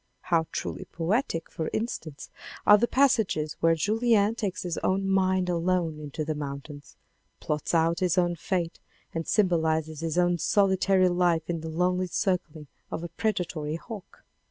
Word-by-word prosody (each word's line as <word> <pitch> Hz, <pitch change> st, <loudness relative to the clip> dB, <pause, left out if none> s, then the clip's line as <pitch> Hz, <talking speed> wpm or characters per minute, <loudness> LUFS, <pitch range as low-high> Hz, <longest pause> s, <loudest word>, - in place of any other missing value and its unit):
How 165 Hz, -2 st, +1 dB
truly -, -, -4 dB
poetic, 170 Hz, 0 st, -1 dB
for 160 Hz, -, -3 dB
instance, 165 Hz, -, -4 dB, 0.3 s
are 210 Hz, 0 st, +8 dB
the 235 Hz, -, +2 dB
passages 220 Hz, -, +2 dB
where 165 Hz, 0 st, +4 dB
Julien 215 Hz, +4 st, +2 dB
takes 205 Hz, -5 st, -3 dB
his 175 Hz, -2 st, -3 dB
own 195 Hz, +1 st, 0 dB
mind 190 Hz, -1 st, +2 dB
alone 170 Hz, -2 st, 0 dB
into 150 Hz, +1 st, -5 dB
the 155 Hz, -, -1 dB
mountains, 145 Hz, 0 st, -7 dB, 0.4 s
plots 150 Hz, +3 st, -2 dB
out 165 Hz, +1 st, +2 dB
his 180 Hz, -2 st, +1 dB
own 175 Hz, -1 st, +2 dB
fate, 170 Hz, 0 st, -2 dB, 0.3 s
and 165 Hz, 0 st, -3 dB
symbolizes 160 Hz, -6 st, +1 dB
his 165 Hz, 0 st, -2 dB
own 175 Hz, -1 st, +2 dB
solitary 190 Hz, -1 st, +3 dB
life 175 Hz, -2 st, +1 dB
in 165 Hz, -2 st, -3 dB
the 160 Hz, -, -5 dB
lonely 180 Hz, +3 st, 0 dB
circlings 175 Hz, -5 st, -2 dB, 0.2 s
of 165 Hz, -, -4 dB
a 170 Hz, -, -5 dB
predatory 170 Hz, -5 st, -2 dB
hawk. 205 Hz, +3 st, -10 dB
175 Hz, 155 wpm, -27 LUFS, 160-190 Hz, 0.4 s, are